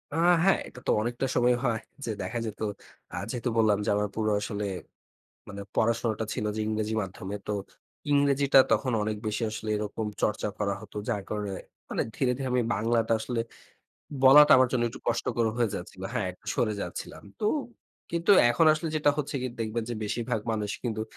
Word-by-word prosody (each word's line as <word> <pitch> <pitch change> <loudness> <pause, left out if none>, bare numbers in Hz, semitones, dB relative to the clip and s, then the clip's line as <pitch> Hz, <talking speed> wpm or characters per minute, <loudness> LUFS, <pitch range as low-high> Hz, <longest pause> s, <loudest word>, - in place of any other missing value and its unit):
আ - - -1 0.3
হ্যাঁ, 195 +1 +4
এটা - - -12
তো - - +4
অনেকটা 120 +3 -2
সময় 125 0 +4
হয় 115 -2 +1 0.3
যে 115 - -2
দেখা 120 0 -3
যেত। 110 - -6 0.5
আ - - -4 0.2
যেহেতু 125 0 -2
বললাম 110 -2 +4
যে - - 0
আমার 105 0 +1
পুরো 110 -1 0
আসলে 105 0 -3 0.8
মানে 100 0 -7
পড়াশোনাটা 115 -1 +1
ছিল - - -3
যে - - -1
ইংরেজি 110 0 -1
মাধ্যমে। 95 +1 -6
তো - - 0 0.6
ইংরেজিটা 140 -1 +4
তখন 125 +3 +1
অনেক 105 0 -1
বেশি 105 +2 -2
আসলে 110 0 -6
এরকম 105 +1 -3 0.2
চর্চা 105 - 0
করা 100 -1 0
হতো। 105 -1 -12
যার 105 -4 -1
কারণে 105 -2 -3 0.4
মানে - - 0
ধীরে, 130 -2 +2
ধীরে 135 -1 -2
আমি 125 -1 +3
বাংলাটা 115 +2 +1
আসলে 120 0 -2 0.8
বলাটা 145 +3 +9
আমার 130 -1 +5
জন্য 125 -2 +1
একটু - - -10
কষ্টকর 120 0 0
হয়ে 120 -4 +1
যাচ্ছিল 95 0 -7
হ্যাঁ, 100 - 0
একটু 90 - -24
সরে 110 -2 +1
যাচ্ছিলাম। - - -7 0.2
তো 210 - +1 0.6
কিন্তু 170 +3 0 0.2
এখন 160 +7 +3
আসলে 160 +2 -2
যেটা 150 -1 +4
হচ্ছে 145 0 -3
গিয়ে 130 -1 -3
দেখবেন 115 +1 -2
যে - - -2
বেশিরভাগ 115 +1 -2
মানুষ 105 -2 -2
কিন্তু 110 -2 -1
115 Hz, 180 wpm, -28 LUFS, 105-125 Hz, 0.8 s, বলাটা